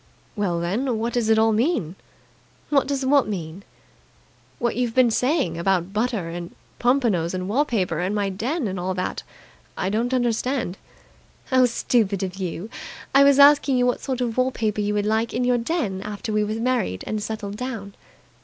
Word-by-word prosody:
"Well, 190 Hz, -5 st, -1 dB
then, 225 Hz, +8 st, -1 dB
what 230 Hz, +2 st, -2 dB
does 235 Hz, -3 st, 0 dB
it 220 Hz, -, +5 dB
all 220 Hz, 0 st, +4 dB
mean?" 220 Hz, -, 0 dB, 0.8 s
"What 275 Hz, -2 st, +3 dB
does 275 Hz, -1 st, -1 dB
what 275 Hz, -2 st, +4 dB
mean?" 180 Hz, -3 st, -5 dB, 1.0 s
"What 240 Hz, -1 st, -1 dB
you've 240 Hz, -1 st, -1 dB
been 255 Hz, -2 st, +5 dB
saying 250 Hz, -, 0 dB
about 185 Hz, +1 st, 0 dB
butter 220 Hz, -4 st, -1 dB
and 170 Hz, 0 st, -7 dB, 0.2 s
pompanos 230 Hz, -10 st, +1 dB
and 185 Hz, 0 st, -3 dB
wall 265 Hz, +9 st, +2 dB
paper 185 Hz, -, -1 dB
and 185 Hz, +4 st, -1 dB
my 200 Hz, -1 st, 0 dB
den 240 Hz, -, -2 dB
and 190 Hz, -1 st, -4 dB
all 185 Hz, +1 st, -2 dB
that? 185 Hz, 0 st, -3 dB, 0.6 s
I 185 Hz, -, -1 dB
don't 230 Hz, +4 st, 0 dB
understand." 245 Hz, -4 st, -1 dB, 0.7 s
"How 255 Hz, -1 st, +5 dB
stupid 215 Hz, -4 st, 0 dB
of 185 Hz, 0 st, -4 dB
you! 185 Hz, +1 st, -4 dB, 0.5 s
I 275 Hz, +1 st, +7 dB
was 280 Hz, -1 st, +5 dB
asking 280 Hz, -2 st, +6 dB
you 245 Hz, -, +3 dB
what 245 Hz, -, 0 dB
sort 260 Hz, -2 st, -3 dB
of 235 Hz, -2 st, -2 dB
wall 255 Hz, 0 st, +3 dB
paper 215 Hz, -4 st, -1 dB
you 205 Hz, 0 st, -1 dB
would 205 Hz, 0 st, 0 dB
like 220 Hz, +2 st, 0 dB
in 250 Hz, -, 0 dB
your 245 Hz, -1 st, +2 dB
den 230 Hz, -, -2 dB
after 210 Hz, +2 st, -5 dB
we 210 Hz, 0 st, +2 dB
were 210 Hz, +1 st, -2 dB
married 230 Hz, -, -1 dB
and 215 Hz, -1 st, -3 dB
settled 205 Hz, -1 st, -5 dB
down." 225 Hz, -6 st, -5 dB
220 Hz, 185 wpm, -23 LUFS, 195-250 Hz, 1.0 s, I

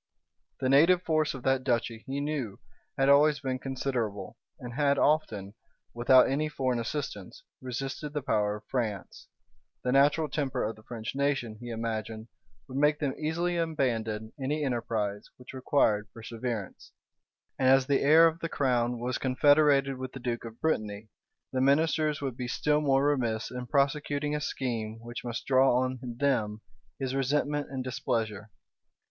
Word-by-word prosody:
The 130 Hz, -, 0 dB
native 165 Hz, +7 st, +5 dB
force 155 Hz, -3 st, +1 dB
of 130 Hz, -, -9 dB
that 135 Hz, -1 st, +1 dB
duchy, 115 Hz, -3 st, -1 dB
he 135 Hz, +1 st, -2 dB
knew, 140 Hz, -8 st, -3 dB, 0.4 s
had 135 Hz, -, +3 dB
always 145 Hz, +1 st, +5 dB
been 130 Hz, -2 st, -3 dB
considerable, 125 Hz, -7 st, -3 dB, 0.2 s
and 125 Hz, -1 st, -7 dB
had 140 Hz, +1 st, +2 dB
often, 110 Hz, -11 st, +1 dB, 0.4 s
without 125 Hz, +2 st, +5 dB
any 150 Hz, +3 st, 0 dB
foreign 130 Hz, -4 st, -1 dB
assistance, 145 Hz, -, -5 dB, 0.2 s
resisted 135 Hz, +4 st, -5 dB
the 150 Hz, -2 st, -3 dB
power 105 Hz, -5 st, +1 dB
of 105 Hz, -, -10 dB
France; 110 Hz, -7 st, -4 dB, 0.6 s
the 125 Hz, -, 0 dB
natural 145 Hz, +4 st, +4 dB
temper 135 Hz, -3 st, -2 dB
of 110 Hz, +1 st, -2 dB
the 110 Hz, -, -16 dB
French 110 Hz, 0 st, -6 dB
nation, 135 Hz, -5 st, -1 dB
he 120 Hz, -, -7 dB
imagined, 110 Hz, -1 st, -4 dB, 0.4 s
would 130 Hz, +1 st, -4 dB
make 150 Hz, +1 st, +3 dB
them 140 Hz, -3 st, -1 dB
easily 170 Hz, +3 st, -1 dB
abandon 115 Hz, -9 st, -1 dB
any 150 Hz, +3 st, -1 dB
enterprise 110 Hz, -5 st, -2 dB
which 125 Hz, +1 st, -12 dB
required 120 Hz, -5 st, +1 dB
perseverance; 115 Hz, -2 st, -6 dB, 0.7 s
and 130 Hz, -, +3 dB
as 135 Hz, 0 st, +5 dB
the 140 Hz, 0 st, +2 dB
heir 155 Hz, +4 st, +7 dB
of 165 Hz, 0 st, +1 dB
the 165 Hz, -, -3 dB
crown 125 Hz, -4 st, +1 dB
was 125 Hz, +1 st, -2 dB
confederated 140 Hz, 0 st, +3 dB
with 130 Hz, 0 st, -6 dB
the 135 Hz, -, -7 dB
duke 120 Hz, -1 st, -3 dB
of 115 Hz, 0 st, -10 dB
Brittany, 110 Hz, -8 st, -2 dB, 0.4 s
the 130 Hz, -, +1 dB
ministers 155 Hz, +2 st, +2 dB
would 135 Hz, -4 st, -3 dB
be 125 Hz, 0 st, -4 dB
still 150 Hz, +4 st, +1 dB
more 135 Hz, -1 st, +3 dB
remiss 120 Hz, -6 st, 0 dB
in 125 Hz, 0 st, -6 dB
prosecuting 145 Hz, +1 st, 0 dB
a 150 Hz, -, -1 dB
scheme 115 Hz, -6 st, -3 dB
which 120 Hz, 0 st, -7 dB
must 120 Hz, -1 st, -5 dB
draw 130 Hz, -1 st, +4 dB
on 130 Hz, 0 st, -2 dB
them 120 Hz, -4 st, -1 dB, 0.4 s
his 135 Hz, -1 st, -3 dB
resentment 145 Hz, +2 st, 0 dB
and 135 Hz, -1 st, -4 dB
displeasure. 110 Hz, -4 st, -2 dB
130 Hz, 160 wpm, -29 LUFS, 115-145 Hz, 0.7 s, heir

